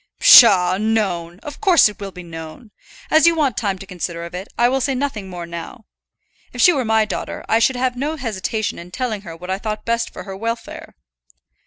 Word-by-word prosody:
"Psha, 185 -5 +7
known! 195 -6 -1
of 295 +4 -9
course 370 - +5
it 210 - -8
will 200 -1 -6
be 180 -1 -10
known. 165 +6 -10 0.4
As 315 +2 +5
you 335 - +4
want 285 -8 0
time 200 -3 -2
to 195 - -10
consider 175 -3 -5
of 170 +1 -9
it, 185 +2 -6
I 240 - +4
will 265 +2 0
say 270 +1 0
nothing 250 -8 -3
more 175 -2 -7
now. 170 +7 -9 0.7
If - - -9
she 360 - +6
were 270 -4 -1
my 220 -1 +2
daughter, 215 - -6
I 225 - +3
should 255 +3 +2
have 250 0 -1
no 290 +5 -3
hesitation 220 -4 -3
in 170 +1 -11
telling 220 0 -3
her 170 -5 -9
what 180 +2 -7
I 190 - -2
thought 215 0 -5
best 230 0 -1
for - - -9
her 195 -2 -8
welfare." 230 +3 -6
215 Hz, 215 wpm, -19 LUFS, 180-250 Hz, 0.7 s, Psha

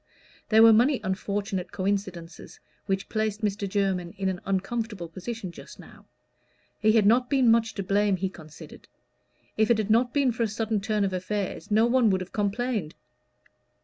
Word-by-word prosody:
There 220 0 +6
were 225 -1 +8
many 250 +5 +3
unfortunate 195 0 -3
coincidences 190 -4 -4 0.3
which 195 -1 -1
placed 215 0 -2
Mr. 200 -1 -1
Jermyn 190 -3 -1
in 190 0 -1
an 185 -1 -4
uncomfortable 195 -1 -3
position 190 +3 -6
just - - -13
now; - - -15 0.7
he 215 0 +3
had 220 -3 +4
not 245 +4 +3
been 260 -5 +4
much 225 -1 +2
to 195 - -3
blame, 200 +1 +2
he 190 +1 -2
considered; 155 -5 -13 0.7
if 220 +1 +2
it 235 - +4
had 215 -1 -1
not 240 +2 +3
been 275 -2 +2
for 235 - -5
a 230 - +2
sudden 215 0 -2
turn 210 0 0
of 195 -1 -1
affairs 190 +2 -4
no 220 +2 +4
one 240 -1 +3
would 190 -1 +1
have 185 - -8
complained. 210 -4 -2
205 Hz, 175 wpm, -26 LUFS, 190-225 Hz, 0.7 s, were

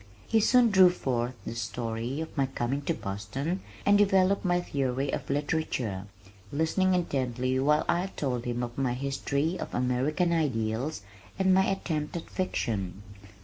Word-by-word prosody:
He 225 - +3
soon 240 +1 +5
drew 190 -2 +8
forth 125 -7 -2
the - - -4
story 115 +4 -3
of 160 - -7
my 135 -3 +2
coming 130 +1 -2
to - - +1
Boston 115 - -3 0.2
and 205 0 +5
developed 195 -1 +4
my 175 -2 +2
theory 135 -4 -1
of - - -4
literature, 135 -9 -1 0.4
listening 170 +5 +2
intently 130 -6 0
while 150 +3 +3
I 180 +2 +1
told 130 -9 -3
him 120 0 -2
of 120 +2 -5
my 125 -2 +1
history 140 +4 -1
of - - -5
American 135 +8 +1
Ideals 125 -4 -1 0.3
and 190 0 +4
my 190 +1 +5
attempt 160 -5 -2
at 165 - -8
fiction. 100 - -2
140 Hz, 150 wpm, -28 LUFS, 120-175 Hz, 0.4 s, drew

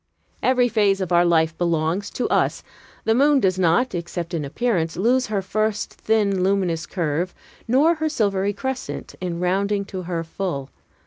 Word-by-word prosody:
Every 250 -1 +3
phase 205 -4 +2
of 185 -2 -3
our 175 0 +5
life 165 -2 +2
belongs 170 +3 0
to 250 - -2
us. - - +1 0.4
The 225 - +2
moon 285 +3 +4
does 190 -5 +1
not, 180 +8 +2
except 175 0 -4
in 160 -3 -1
appearance, 165 - -1
lose 250 +6 +2
her 205 -2 -1
first 215 +2 -1
thin, 205 -4 +1
luminous 185 -4 0
curve, 170 0 -2 0.3
nor 280 +8 +4
her 315 -1 -1
silvery 200 -7 0
crescent, 260 +5 -5
in 175 -2 -3
rounding 200 +3 0
to 190 -1 -6
her 170 -2 -3
full. 160 -5 -4
190 Hz, 165 wpm, -22 LUFS, 170-220 Hz, 0.4 s, our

